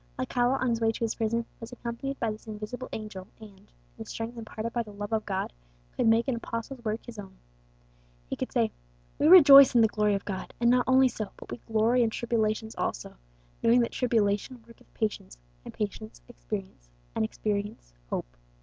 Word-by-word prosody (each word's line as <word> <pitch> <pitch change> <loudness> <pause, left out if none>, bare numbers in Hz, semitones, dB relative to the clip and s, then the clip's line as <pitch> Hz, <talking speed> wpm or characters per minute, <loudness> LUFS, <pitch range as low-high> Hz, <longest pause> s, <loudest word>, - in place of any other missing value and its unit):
Alcala, 245 +2 +1
on 255 -1 0
his 230 0 -1
way 225 0 +3
to 225 - -5
his 225 - 0
prison, 230 +1 -1
was 230 +1 -9
accompanied 245 +3 -5
by 230 -2 0
this 215 +1 -10
invisible 215 +4 -6
angel, 210 -4 -7
and, 215 -2 -11
in - - -24 0.3
the - - -6
strength 225 +1 -5
imparted 225 0 -6
by 240 - 0
the 220 - -8
love 205 +1 -6
of 220 -1 -1
God, 190 - -2 0.4
could - - +1
make 225 +3 +4
an 260 - +1
apostle's 230 +2 -6
words 220 0 -3
his 235 -3 -9
own. 195 -2 -10 0.9
He - - -3
could - - -4
say, - - +1 0.5
"_We 300 - +4
rejoice 280 -7 +10
in 235 - +7
the 220 - +6
glory 210 -1 +1
of 195 - -4
God. 190 -2 -6
And 235 0 +4
not 250 0 +3
only 260 0 +6
so, 215 -5 -4
but - - -11
we - - -4
glory 225 +2 +3
in 230 - +3
tribulations 220 -1 -1
also: - - -3 0.5
knowing 235 +2 +5
that 235 - -1
tribulation 225 0 0
worketh 230 -1 -19
patience; 210 - -3 0.3
and - - -8
patience, 185 - -5
experience; - - -7 0.2
and - - 0
experience, 200 - -3 0.2
hope. - - -4
225 Hz, 195 wpm, -28 LUFS, 210-240 Hz, 0.9 s, rejoice